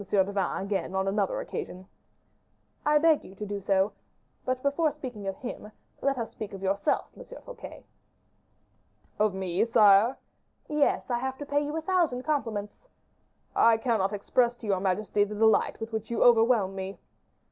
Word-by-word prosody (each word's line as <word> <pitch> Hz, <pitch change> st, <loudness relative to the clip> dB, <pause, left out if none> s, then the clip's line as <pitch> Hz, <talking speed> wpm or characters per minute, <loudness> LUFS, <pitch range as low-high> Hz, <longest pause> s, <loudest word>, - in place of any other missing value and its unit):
de 195 Hz, 0 st, +2 dB
Vannes 195 Hz, -1 st, -1 dB
again 195 Hz, -1 st, -2 dB
on 190 Hz, 0 st, 0 dB
another 195 Hz, 0 st, 0 dB
occasion 185 Hz, +1 st, -6 dB, 0.5 s
" -, -, -42 dB
"I 300 Hz, 0 st, +5 dB
beg 315 Hz, 0 st, +4 dB
you 190 Hz, -, -13 dB
to 210 Hz, -, -6 dB
do 205 Hz, 0 st, -4 dB
so. 195 Hz, +1 st, +2 dB, 0.5 s
But 255 Hz, 0 st, -2 dB
before 285 Hz, +3 st, +2 dB
speaking 255 Hz, -9 st, -7 dB
of 195 Hz, -, -2 dB
him, 230 Hz, -4 st, -8 dB, 0.3 s
let 275 Hz, -1 st, +1 dB
us 230 Hz, -2 st, -4 dB
speak 210 Hz, -2 st, -7 dB
of 195 Hz, 0 st, -8 dB
yourself, 200 Hz, +7 st, +1 dB
M. -, -, -10 dB
Fouquet." -, -, -11 dB, 1.4 s
"Of 210 Hz, -2 st, +2 dB
me, 185 Hz, -2 st, 0 dB
sire?" 215 Hz, +1 st, +5 dB, 0.5 s
"Yes, 300 Hz, -3 st, +1 dB
I 240 Hz, -, +1 dB
have 265 Hz, +1 st, -3 dB
to 290 Hz, -, -6 dB
pay 285 Hz, 0 st, +1 dB
you 295 Hz, +2 st, -3 dB
a -, -, -2 dB
thousand 325 Hz, -8 st, +1 dB
compliments." 235 Hz, -, -3 dB, 0.7 s
"I 230 Hz, -1 st, +5 dB
cannot 220 Hz, -4 st, 0 dB
express 235 Hz, +4 st, +1 dB
to 235 Hz, -, -12 dB
your 195 Hz, -3 st, +1 dB
majesty 200 Hz, +2 st, +1 dB
the 210 Hz, +1 st, -4 dB
delight 220 Hz, 0 st, +3 dB
with 225 Hz, 0 st, -6 dB
which 220 Hz, -1 st, -3 dB
you 235 Hz, -, +1 dB
overwhelm 225 Hz, -4 st, +4 dB
me." 190 Hz, 0 st, -6 dB
220 Hz, 170 wpm, -28 LUFS, 195-260 Hz, 1.4 s, I